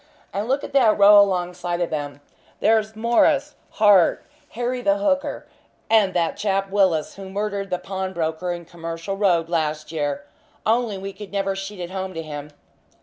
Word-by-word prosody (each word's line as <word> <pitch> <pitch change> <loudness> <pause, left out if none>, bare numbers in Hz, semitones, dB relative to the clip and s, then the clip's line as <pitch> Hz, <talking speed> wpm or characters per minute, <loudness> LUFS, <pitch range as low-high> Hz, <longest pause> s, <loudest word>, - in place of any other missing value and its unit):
And 205 +3 -2
look 270 +3 0
at - - -7
that 245 -6 +4
row 205 0 +8
alongside 180 -2 -1
of 175 - -1
them 145 -2 -4 0.4
there's 220 0 +2
Morris, 270 +6 +2 0.2
Hart, 205 -5 +4 0.3
Harry 245 +2 -2
the 295 +4 +2
Hooker, 290 -2 -1 0.5
and 205 -4 +4
that 170 -2 0
chap 195 -1 -1
Willis 190 -6 +1
who 195 -1 -8
murdered 200 0 -3
the 180 - 0
pawnbroker 180 -3 -3
in 175 -1 -6
Commercial 165 +2 -6
Road 180 -5 +2
last 155 -2 -2
year, 150 +3 -2 0.4
only 225 -2 +1
we 195 +1 -6
could 205 0 -10
never 195 -1 -1
sheet 195 +1 -6
it 175 0 -6
home 190 -1 -5
to 165 - -4
him. 150 -1 -7
195 Hz, 165 wpm, -22 LUFS, 170-210 Hz, 0.5 s, row